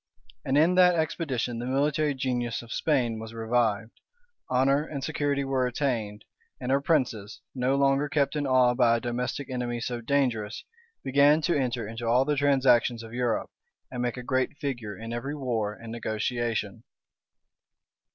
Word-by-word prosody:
And 135 +1 +1
in 165 +4 +5
that 180 -1 +5
expedition 140 -7 -2
the 120 - -4
military 145 +2 +1
genius 120 -3 -2
of 120 - -8
Spain 125 -8 0
was 110 +1 -8
revived; 110 -1 0 0.6
honor 135 +3 +3
and 145 -3 -6
security 145 -2 -1
were 135 -2 0
attained; 115 -5 -2 0.3
and 125 0 -3
her 140 +1 +3
princes, 125 -9 0
no 130 +1 +1
longer 140 +1 +2
kept 145 0 +1
in 145 -2 -1
awe 130 -2 +4
by 120 -2 +3
a - - -3
domestic 125 +4 -3
enemy 120 -1 -2
so 120 0 -4
dangerous, 120 -5 -1 0.4
began 140 +3 +4
to 170 +3 +1
enter 125 -5 -1
into 115 +1 -5
all 125 +3 +4
the 150 0 +1
transactions 130 -4 +3
of 115 0 -11
Europe, 120 -2 -1 0.4
and 125 -1 -4
make 125 0 -2
a 125 - -6
great 130 +3 -1
figure 120 -9 -4
in 115 +1 -6
every 135 +5 -4
war 115 -7 -2
and 115 0 -10
negotiation. 115 -1 -2
125 Hz, 160 wpm, -27 LUFS, 115-140 Hz, 0.6 s, in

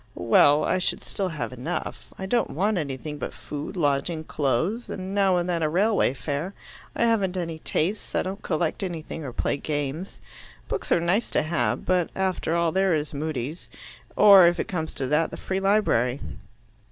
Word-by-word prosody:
Well, 145 +6 +5
I 185 - +1
should 185 - -1
still 195 - -2
have 155 -5 -4
enough. 140 +8 -5
I 190 - -5
don't 235 +5 +1
want 195 +4 0
anything 150 0 -5
but - - -5
food, 150 +6 -6
lodging, 150 +1 0
clothes, 160 - -1
and 190 +1 -5
now 195 -2 +3
and 175 0 -1
then 170 -2 0
a 155 - +1
railway 195 - +2
fare. 145 +8 -4 0.4
I - - +1
haven't 200 -5 +2
any 165 -3 -3
tastes. 185 +7 -2
I - - +2
don't 195 +2 -5
collect 160 0 -1
anything 165 -3 -5
or 135 - -5
play 125 - -1
games. 145 +4 -4 0.5
Books - - -4
are - - +5
nice 180 +7 +1
to - - +1
have, 125 -8 -1
but 180 -2 +2
after 185 -3 0
all 170 -1 +2
there 190 -1 +2
is 150 0 -3
Mudie's, 150 +1 -4 0.5
or 200 -4 +8
if 175 0 +1
it - - -1
comes 160 -4 -4
to 135 - -2
that, 150 +5 +2
the - - -8
Free 190 0 -2
Library. 195 - +2
170 Hz, 185 wpm, -25 LUFS, 150-190 Hz, 0.5 s, or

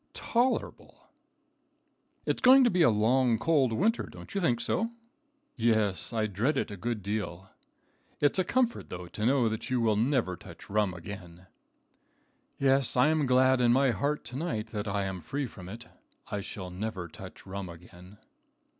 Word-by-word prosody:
"Tolerable." 245 +2 -2 1.1
"It's - - -1
going 260 +1 +8
to 240 - +4
be 180 - +2
a 160 - +7
long, 115 +3 +3
cold 140 -3 +2
winter; 215 - +1
don't - - -11
you 200 - -1
think 120 -9 +2
so?" 195 - 0 0.7
"Yes, 110 -5 +1
I 110 -2 0
dread 110 +9 0
it - - -1
a - - -5
good 110 +1 -3
deal." 100 -2 -4 0.7
"It's 145 +5 +2
a - - +4
comfort, 240 +4 0
though, 90 0 -6
to 110 - -3
know 130 -3 +3
that 110 +3 -3
you 115 -4 +2
never 120 -2 +1
will 90 - -6
touch - - -13
rum 105 -3 +1
again." 90 -1 -9 1.1
"Yes, 135 -2 +2
I 125 +5 +5
am 155 -3 +1
glad 130 0 +4
in 120 -1 +4
my 130 +1 +4
heart 145 +5 -1
to 125 - -8
night 120 -8 -3
that 105 -1 -4
I 100 0 -1
am 95 -2 -4
free 140 - -3
from 95 -6 -10
it. 115 +4 -9 0.5
I 105 - -2
shall 95 -2 -7
never 95 -1 -4
touch 80 - -12
rum 95 -1 -6
again." 90 +3 -13
115 Hz, 170 wpm, -29 LUFS, 100-135 Hz, 1.1 s, going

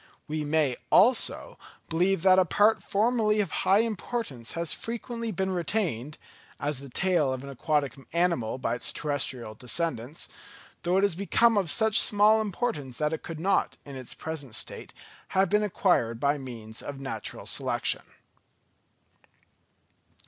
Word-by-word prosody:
We 155 0 -2
may, 145 -4 +1
also, 260 - +3 0.3
believe 180 +2 +1
that 190 -1 +6
a - - +6
part 210 +3 +3
formerly 215 +1 +1
of 195 -5 0
high 195 +3 +3
importance 215 - -3
has 170 -1 0
frequently 230 0 -4
been 190 0 -1
retained 170 - -2 0.4
(as 145 -2 -2
the 140 0 -10
tail 175 -1 +1
of 130 0 -4
an 140 - -7
aquatic 140 -1 0 0.2
animal 170 -10 +1
by 125 -3 -1
its 120 - -1
terrestrial 130 -6 -3
descendants), 130 +2 -2 0.5
though 175 +2 +1
it 195 - +3
has 200 - +3
become 215 +5 +3
of 195 -5 +1
such 220 +6 +4
small 210 +1 +4
importance 180 - -3
that 150 +1 0
it 160 - -3
could 165 -2 -7
not, 195 +4 +1
in 140 -1 -8
its 130 -2 -5
present 145 -7 -6
state, - - -3 0.5
have 195 +1 +3
been 210 0 +4
acquired 175 - +1
by 145 +2 +1
means 115 -4 -7
of 140 -1 -7
natural 115 -6 -5
selection. - - 0
165 Hz, 150 wpm, -27 LUFS, 135-205 Hz, 0.5 s, that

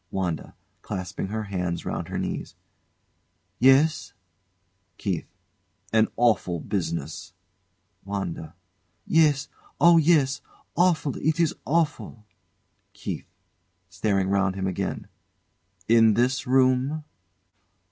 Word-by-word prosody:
WANDA. 90 -5 -3 0.3
[Clasping 95 +1 -5
her 110 +2 -3
hands 90 -4 -3
round - - -3
her - - -4
knees.] - - -4 1.0
Yes? 140 +5 +4 0.8
KEITH. - - -3 0.7
An 110 0 +4
awful 100 -7 +2
business! 85 -3 -4 0.7
WANDA. 95 -4 -5 0.5
Yes; 150 -4 +3 0.3
oh, 170 -1 +7
yes! 145 -4 +3 0.3
Awful 170 -5 +2
it 155 +2 0
is 165 -3 +2
awful! 150 -8 -1 0.7
KEITH. - - -6 0.6
[Staring 95 0 0
round 100 -1 +1
him 95 -1 -3
again.] 95 -2 -3 0.8
In 115 -2 +5
this 125 +5 +1
room? 130 +3 +2
115 Hz, 95 wpm, -25 LUFS, 95-145 Hz, 1.0 s, oh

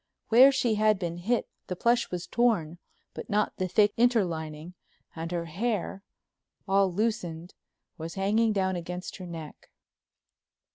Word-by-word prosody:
Where 255 +5 +8
she 250 -4 +1
had 215 -1 +3
been 170 -2 -4
hit 230 +7 0 0.2
the 180 - -3
plush 235 +5 +2
was 180 -1 -4
torn 200 -9 +1 0.3
but - - -8
not 210 0 0
the 185 - -1
thick 205 +3 +3
interlining, 170 -9 0 0.4
and 165 +1 -5
her 170 -1 -2
hair, 195 +3 -2 0.7
all 195 -1 +3
loosened, 180 -5 -2 0.5
was 165 +1 -6
hanging 215 +4 +2
down 190 -2 0
against 180 +1 -6
her 185 -2 -8
neck. 160 -3 -9
190 Hz, 140 wpm, -28 LUFS, 170-220 Hz, 0.7 s, Where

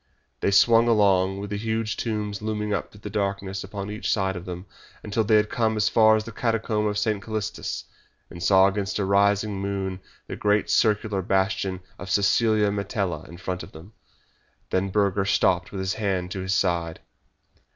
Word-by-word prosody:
They - - +1
swung 115 +4 +5
along, 95 -4 +3
with 100 0 -6
the 105 - -2
huge 110 0 -2
tombs 105 -3 -3
looming 105 -1 -2
up 100 - -3
through 105 - -16
the 105 - -6
darkness 100 -2 -2
upon 100 +1 -6
each 105 +3 -2
side 95 -2 0
of 90 0 -7
them, 90 0 -7 0.4
until 105 +2 0
they 110 +1 +3
had 105 0 +3
come 110 -2 +1
as 105 - +2
far 110 -1 +5
as 110 - -1
the 115 - -8
Catacombs 110 -2 0
of 105 - -3
St. 105 -1 0
Calistus, 110 -2 -4 0.4
and 85 - -11
saw 95 +1 +5
against 100 0 -1
a 100 - 0
rising 100 +1 +2
moon 95 -1 -3 0.3
the - - -6
great 105 0 +1
circular 105 -2 +2
bastion 95 0 0 0.2
of 100 - -7
Cecilia 105 +2 +3
Metella 100 -5 -3
in 85 - -10
front 90 +1 -4
of - - -11
them. 85 +7 -13 0.8
Then 95 +1 +1
Burger 100 0 +1
stopped 95 -1 +2
with 100 - -6
his 95 0 -1
hand 95 -4 -2
to 95 - -4
his 95 +1 -1
side. 85 -3 0
100 Hz, 185 wpm, -25 LUFS, 95-105 Hz, 0.8 s, swung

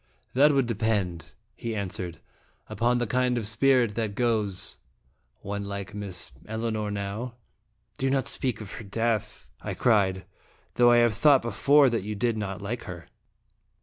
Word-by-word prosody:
" - - -38
That 145 +4 +6
would 135 -3 +3
depend," 105 -7 -1 0.3
he 115 -1 -4
answered, 90 -4 -4 0.5
"upon 120 +4 +1
the 120 - 0
kind 125 +2 +1
of 115 - -2
spirit 120 +1 +3
that 110 -2 -2
goes. 105 -5 0 0.6
One 100 +1 -4
like 100 0 -5
Miss 100 -4 -6 0.2
Elinor 110 -1 -2
now 105 +4 -4 0.3
" - - -38
"Do 135 - +1
not 135 -1 +1
speak 125 -4 -1
of 100 - -8
her - - -7
death," 110 - -2
I - - -4
cried; 95 -5 +2 0.5
"though 120 0 +5
I 120 - +6
have 120 -2 +4
thought 135 +4 +5
before 140 +6 +4
that 115 - 0
you 105 +2 -4
did 115 +2 0
not 100 -2 -4
like 120 +4 -4
her." 90 -5 -9
110 Hz, 165 wpm, -27 LUFS, 100-120 Hz, 0.6 s, That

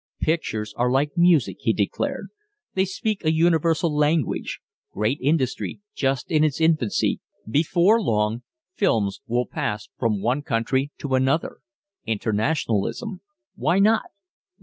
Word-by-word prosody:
"Pictures 110 -10 -1
are 125 +1 +2
like 140 +4 +1
music," 170 -4 +3
he - - +1
declared. - - -2 0.4
"They 190 0 +2
speak 200 +2 -3
a 155 - +3
universal 165 -1 +2
language. 150 -1 0 0.3
Great 110 +7 -1
industry 140 +2 0
just 135 -1 -1
in 155 -1 +4
its 155 -2 +1
infancy 155 -9 +2 0.3
before 170 - +3
long 110 - 0 0.3
films 105 - 0
will 120 +1 0
pass 105 -2 -4
from 110 -4 +1
one 125 +6 +1
country 130 0 0
to 140 -2 -3
another 130 +4 +1 0.5
internationalism. 115 - -1 0.3
Why 175 - +1
not? 215 +3 +4
145 Hz, 125 wpm, -23 LUFS, 115-165 Hz, 0.5 s, in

